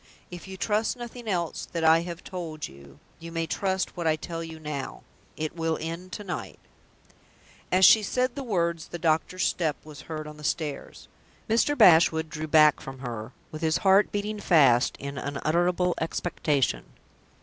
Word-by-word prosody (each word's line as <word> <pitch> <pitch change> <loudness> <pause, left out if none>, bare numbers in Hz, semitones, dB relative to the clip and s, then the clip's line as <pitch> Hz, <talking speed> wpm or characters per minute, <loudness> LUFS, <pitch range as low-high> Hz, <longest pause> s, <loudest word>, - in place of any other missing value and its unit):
If 175 0 -9
you 190 0 -8
trust 215 +5 0
nothing 240 -1 -8
else 175 -5 -2
that 165 -1 -2
I 160 +1 +6
have 170 0 -7
told 165 -5 -6
you, 70 0 -16 0.2
you 165 0 -9
may 165 0 -1
trust 190 +2 -2
what 170 -2 -2
I 155 - +3
tell 165 +1 -6
you 160 -1 -8
now. 150 -3 -6 0.3
It 155 +1 -3
will 165 -1 -1
end 170 +3 -6
to 210 - -5
night." 180 -5 -6 1.1
As 185 +1 +6
she 220 - +8
said 250 +4 0
the 280 - -5
words, 170 -9 -1
the 175 - -6
doctor's 165 +3 0
step 160 -4 0
was 155 -1 -10
heard 155 -1 -4
on 150 0 -10
the 150 - -12
stairs. 150 -1 -4 0.4
Mr. 235 +6 +2
Bashwood 160 -6 +5
drew 155 0 -4
back 150 -1 +5
from 135 0 -8
her, 115 -2 -6 0.2
with 155 - -7
his 160 -1 +2
heart 195 +2 +5
beating 210 +1 -3
fast 135 -11 +4
in 140 0 -5
unutterable 175 +5 0
expectation. 145 - -1
165 Hz, 170 wpm, -27 LUFS, 155-185 Hz, 1.1 s, she